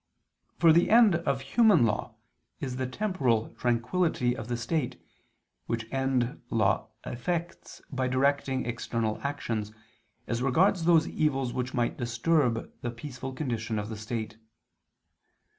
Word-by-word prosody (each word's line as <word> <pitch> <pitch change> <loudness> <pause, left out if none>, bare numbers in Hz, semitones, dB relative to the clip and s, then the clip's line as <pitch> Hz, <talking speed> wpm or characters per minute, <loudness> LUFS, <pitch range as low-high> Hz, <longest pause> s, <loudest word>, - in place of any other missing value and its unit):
For 165 -2 +6
the 170 +2 +4
end 225 -3 +7
of 140 -5 -1
human 175 - +4
law 105 -2 -2 0.4
is 130 -2 -4
the 130 -1 -1
temporal 130 - 0
tranquillity 125 +2 0
of 115 - -7
the 120 -1 -2
state, 125 +1 -2 0.7
which 115 -1 -2
end 135 0 0
law 110 0 +1 0.2
effects 170 +7 -4
by 130 -2 -1
directing 135 0 +1
external 115 -2 -2
actions, 115 -7 -3 0.5
as 115 0 -2
regards 165 +7 +3
those 165 -2 +5
evils 135 -5 0
which 125 0 -3
might 120 -2 0
disturb 120 0 +1
the 120 - -2
peaceful 130 +2 -7
condition 115 -5 -2
of 105 +1 -3
the 110 - -5
state. 110 0 -5
125 Hz, 130 wpm, -28 LUFS, 115-150 Hz, 0.7 s, end